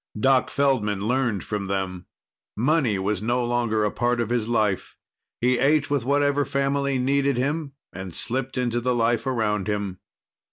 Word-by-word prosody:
Doc 130 +2 +3
Feldman 115 -8 +1
learned 120 -5 0
from 105 -2 -3
them. 95 -2 -3 0.5
Money 130 -3 +2
was 100 +1 -1
no 120 +2 0
longer 120 -3 +1
part 120 0 0
of 115 -1 -1
his 120 -3 0
life. 110 -5 0 0.4
He 125 +1 +2
ate 145 +2 +2
with 140 -5 0
whatever 145 +1 +2
family 140 0 0
needed 140 +1 +1
him 145 +2 -1 0.2
and 95 -1 -7
slipped 130 +2 -3
into 120 -1 0
the 125 +1 +1
life 115 +1 +1
around 105 -6 0
him. 100 -3 -2
120 Hz, 155 wpm, -24 LUFS, 105-135 Hz, 0.5 s, Doc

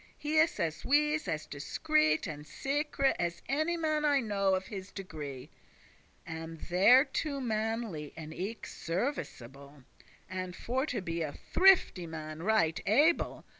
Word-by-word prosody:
He 305 +1 +1
is 320 +1 +3
as 160 -2 -2
wise, 300 +2 +2
as 155 0 -2
discreet, 310 - +1
and 150 -4 -6
secre',* 150 - -18
*secret, 275 -1 0
trusty - - +1
As 170 0 -3
any 310 +6 0
man 310 -2 0
I 290 -2 +4
know 200 -5 +1
of 185 0 -3
his 195 -2 -7
degree, 150 -9 -7 0.7
And 160 0 -7
thereto 260 - +3
manly 220 - -2
and 160 -1 -7
eke 205 +7 -5
serviceble, 140 - -5 0.4
And 185 -1 -5
for 260 +5 -2
to 240 -7 -2
be 170 -2 -3
a 150 -3 -3
thrifty 370 - +4
man 155 -1 -7
right 185 -5 +2
able. 295 +11 +3
200 Hz, 145 wpm, -31 LUFS, -, 0.7 s, I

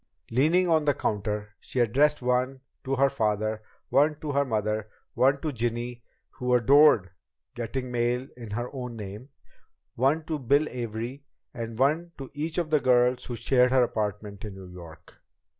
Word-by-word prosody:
Leaning 160 +9 +3
on 160 -3 +3
the 145 -2 +3
counter, 105 0 -2
she 130 - -4
addressed 135 +5 +3
one 125 +2 0 0.2
to 135 0 -1
her 135 +1 +4
father, 110 -2 -1 0.3
one 150 +2 +3
to 150 - -4
her 140 0 +2
mother, 110 -3 -2 0.2
one 135 +2 +3
to 155 +1 -2
Ginny 120 +1 -3 0.3
(who 125 -1 0
adored 125 - +5 0.4
getting 125 +2 -4
mail 120 +2 0
in 120 -3 -9
her 120 +5 -4
own 125 -3 -5
name), 105 +4 -8 0.6
one 140 +6 +1
to 155 -1 -3
Bill 140 +4 +2
Avery, 120 +3 -5 0.3
and 115 -1 -6
one 155 +6 +1
to 135 -2 -8
each 155 +3 -3
of 170 -3 -1
the 155 - +4
girls 125 -1 +3
who 120 - -5
shared 125 +2 +3
her 130 0 +4
apartment 105 -3 -3
in 105 -3 -7
New 95 -2 -11
York. 85 -3 -13
125 Hz, 165 wpm, -27 LUFS, 110-140 Hz, 0.6 s, adored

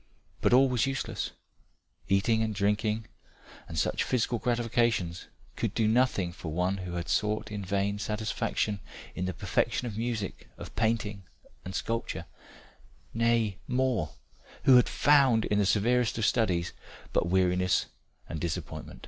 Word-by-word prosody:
But - - +3
all 130 +2 +7
was 125 0 +1
useless 135 0 -2 0.8
eating 100 +3 +3
and 110 -1 -1
drinking, 105 +2 0 0.6
and 80 - -7
such - - +1
physical 120 -1 0
gratifications 115 -7 0 0.3
could - - -2
do 110 - +2
nothing 110 -6 +2
for 85 -4 -6
one 90 +4 0
who 90 -2 -6
had 85 0 -3
sought 105 0 0
in 105 -1 -4
vain 100 +2 -1
satisfaction 105 0 -1 0.3
in 90 - -3
the 95 - -2
perfection 110 +5 0
of 110 -3 -4
music, 115 -4 -3
of - - -10
painting 110 -3 0 0.4
and 95 +1 -6
sculpture 115 -7 -2 0.9
nay, 115 -3 +1
more, 125 - 0 0.5
who 130 - +7
had 125 - +4
found 135 -6 +4
in 105 - +1
the 100 - +3
severest 120 +4 +2
of 115 - +1
studies 90 -9 +1 0.4
but - - +2
weariness 90 0 +2 0.4
and 80 - -5
disappointment." 85 0 -5
105 Hz, 140 wpm, -29 LUFS, 95-115 Hz, 0.9 s, all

